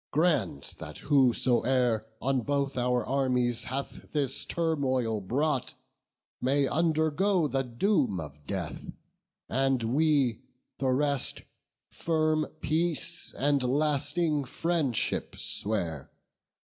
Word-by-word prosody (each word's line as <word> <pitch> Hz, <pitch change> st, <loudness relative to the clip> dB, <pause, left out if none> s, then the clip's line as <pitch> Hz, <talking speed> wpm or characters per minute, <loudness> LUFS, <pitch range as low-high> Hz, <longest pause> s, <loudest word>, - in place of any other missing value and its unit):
grant 140 Hz, -, +1 dB
that -, -, -7 dB
whosoe'er 125 Hz, -4 st, +2 dB, 0.2 s
On 135 Hz, 0 st, +2 dB
both 140 Hz, +2 st, -1 dB
our 125 Hz, -1 st, +1 dB
armies 125 Hz, -3 st, +1 dB
hath 135 Hz, +2 st, -5 dB
this 140 Hz, -3 st, -1 dB
turmoil 130 Hz, -9 st, 0 dB
brought 135 Hz, +6 st, -1 dB, 0.7 s
May 135 Hz, +2 st, +2 dB
undergo 160 Hz, +3 st, +2 dB
the 135 Hz, 0 st, 0 dB
doom 125 Hz, -, +1 dB
of 75 Hz, -2 st, -9 dB
death, -, -, -4 dB, 0.7 s
and 135 Hz, -1 st, +1 dB
we, 135 Hz, -1 st, +2 dB, 0.4 s
The 135 Hz, -, +1 dB
rest, 140 Hz, +1 st, 0 dB, 0.5 s
firm 155 Hz, -1 st, +1 dB
peace 170 Hz, +1 st, -1 dB
and 140 Hz, 0 st, +2 dB
lasting 150 Hz, +3 st, +1 dB
friendship 150 Hz, -3 st, -1 dB
swear." 85 Hz, -9 st, -2 dB
135 Hz, 95 wpm, -29 LUFS, 125-155 Hz, 0.7 s, whosoe'er